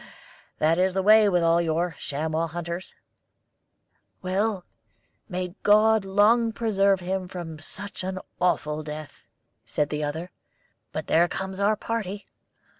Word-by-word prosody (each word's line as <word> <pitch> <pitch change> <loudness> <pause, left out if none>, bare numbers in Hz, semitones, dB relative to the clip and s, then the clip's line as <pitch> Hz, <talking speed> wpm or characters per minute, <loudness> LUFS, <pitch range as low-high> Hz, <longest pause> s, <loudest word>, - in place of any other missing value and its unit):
That 160 +3 +2
is 185 0 +2
the 190 - +1
way 215 +1 +7
with 175 -3 +2
all 165 +1 +4
your 170 +1 -1
chamois 160 +3 -2
hunters." 170 +2 -6 1.3
"Well, 190 +1 -1 0.6
may 180 -1 -3
God 215 0 +4
long 220 +4 +3
preserve 200 -4 +2
him 185 +1 -2
from 170 -3 -7
such 195 +5 -7
an 185 0 -3 0.2
awful 155 -4 0
death!" 150 -1 -9 0.4
said 145 +6 -1
the 150 0 -2
other. 160 +5 -4 0.6
"But - - -4
there 170 +2 +4
comes 190 +1 -5
our 205 +2 +3
party. 210 -3 -4
185 Hz, 130 wpm, -25 LUFS, 165-200 Hz, 1.3 s, way